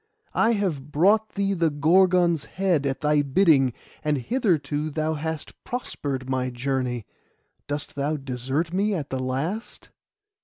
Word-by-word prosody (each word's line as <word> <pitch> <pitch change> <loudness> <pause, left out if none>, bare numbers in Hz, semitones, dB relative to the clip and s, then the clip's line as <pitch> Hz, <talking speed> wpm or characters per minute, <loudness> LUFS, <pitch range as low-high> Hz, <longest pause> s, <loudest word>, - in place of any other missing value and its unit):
I 230 +1 +3
have 160 -9 -2
brought 205 +8 +3
thee 200 -1 +1
the 170 -3 +2
Gorgon's 170 +2 +3
head 175 -6 0
at 135 0 -2
thy 150 -1 +3
bidding, 140 -2 +4 0.3
and 150 -1 +1
hitherto 155 - 0
thou 155 +1 -1
hast 160 0 -5
prospered 140 - -4
my 130 -1 0
journey; 125 -2 -2 0.6
dost 145 0 -4
thou 145 +2 -1
desert 135 +5 -2
me 200 +2 +1
at 150 -5 -4
the 130 - -1
last? 140 - -4
150 Hz, 140 wpm, -25 LUFS, 135-180 Hz, 0.6 s, bidding